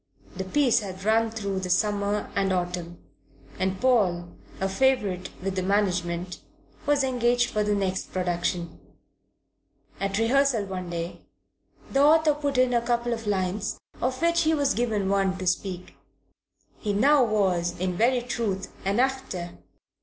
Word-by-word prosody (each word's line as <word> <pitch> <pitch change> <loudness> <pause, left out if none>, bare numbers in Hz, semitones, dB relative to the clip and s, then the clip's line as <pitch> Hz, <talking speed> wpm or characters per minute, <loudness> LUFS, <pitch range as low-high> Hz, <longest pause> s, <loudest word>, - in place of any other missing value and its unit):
The 190 - -4
piece 245 +2 +3
had 190 -3 -7
run 225 +2 +3
through 200 -4 -3
the 185 -1 -4
summer 205 +2 0
and 195 -1 +1
autumn, 175 -1 -2 0.6
and 190 0 -1
Paul, 190 -9 +2 0.3
a 195 - 0
favourite 200 -4 +1
with 195 0 -2
the 185 - 0
management, 180 -2 0 0.5
was 290 -1 +3
engaged 245 -1 +1
for 210 - +1
the 210 0 +1
next 190 -2 -2
production. 175 -2 -2 1.2
At 195 0 -1
rehearsal 240 -1 +2
one 185 -2 -5
day 170 0 -5 0.7
the 275 - +3
author 310 +1 +5
put 285 -2 -2
in 255 -1 +3
a 235 - +3
couple 240 0 0
of 225 -2 -6
lines, 195 0 -1 0.2
of 255 +1 -1
which 340 0 +3
he 320 -1 +3
was 285 -2 +2
given 215 -4 0
one 195 -1 +1
to 185 - -5
speak. 185 0 -2 0.8
He 210 -2 -2
now 275 +6 +5
was 185 -6 +1
in 180 0 -1
very 245 +5 +3
truth 210 -6 -3
an 200 +4 0
actor. 255 -10 -1
205 Hz, 150 wpm, -26 LUFS, 185-245 Hz, 1.2 s, author